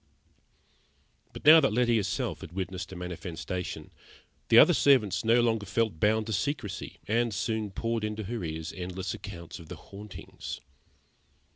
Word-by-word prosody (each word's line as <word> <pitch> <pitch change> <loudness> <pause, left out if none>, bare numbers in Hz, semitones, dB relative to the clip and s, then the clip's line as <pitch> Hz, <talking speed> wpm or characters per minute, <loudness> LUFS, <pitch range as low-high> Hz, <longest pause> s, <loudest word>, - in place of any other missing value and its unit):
But - - -11
now 160 +2 +10
that 135 -8 +2
Letty 120 0 +3
herself 105 - -2
had 85 - -9
witnessed 95 0 -4
a - - -7
manifestation, 90 0 -5 0.6
the - - +6
other - - +9
servants 125 -9 +3
no 115 +2 +4
longer 110 -3 0
felt 105 -4 0
bound 110 +3 +2
to 110 - -3
secrecy, 100 -1 -3
and 115 +2 +1
soon 110 +1 -2
poured 115 +3 -2
into 105 0 -3
her 110 0 -4
ears 80 -1 -4
endless 95 +1 -4
accounts 85 +1 -8
of 85 - -12
the - - -6
hauntings. 105 0 -9
105 Hz, 150 wpm, -29 LUFS, 90-115 Hz, 0.6 s, now